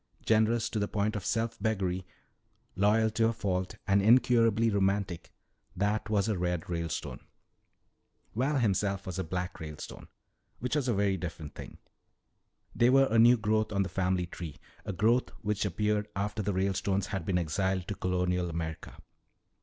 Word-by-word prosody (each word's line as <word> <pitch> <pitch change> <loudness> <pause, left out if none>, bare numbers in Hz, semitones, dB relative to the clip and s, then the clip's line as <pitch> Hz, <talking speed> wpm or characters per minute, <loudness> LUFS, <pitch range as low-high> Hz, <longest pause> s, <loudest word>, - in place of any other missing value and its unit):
Generous 110 +1 +3
to 110 - -2
the 100 - 0
point 105 +1 -1
of 100 - -3
self 115 +2 -1
beggary, 95 -5 -1 0.7
loyal 110 +3 +3
to 115 +1 +2
a 115 - 0
fault, 95 -4 -2
and 100 0 +3
incurably 115 0 +4
romantic, 95 -3 0 0.4
that 105 +4 0
was 105 -1 +2
a 105 -5 -1
"Red" 90 -2 -1
Ralestone. 85 -2 -3 1.2
Val 135 +5 +1
himself 100 -4 0
was 95 -1 -4
a - - 0
"Black" 90 +2 -4
Ralestone, 75 -2 -8 0.5
which 125 +4 -2
was 145 -4 0
a 120 - +1
very 100 -1 +1
different 80 -4 -6
thing. - - -10 1.0
They 120 - +4
were 135 +1 +5
a 115 - +4
new 120 +2 +7
growth 110 0 0
on 100 -1 +1
the 95 - -4
family 90 -1 0
tree, 85 -4 -8 0.3
a - - -3
growth 110 +6 +2
which 105 0 0
appeared 105 +2 0
after 105 +2 -2
the 100 0 -1
Ralestones 95 0 0
had 95 -5 -3
been 90 +1 0
exiled 95 +2 -1
to - - -2
colonial 90 -1 -1
America. 80 -1 -5
100 Hz, 160 wpm, -30 LUFS, 90-110 Hz, 1.2 s, new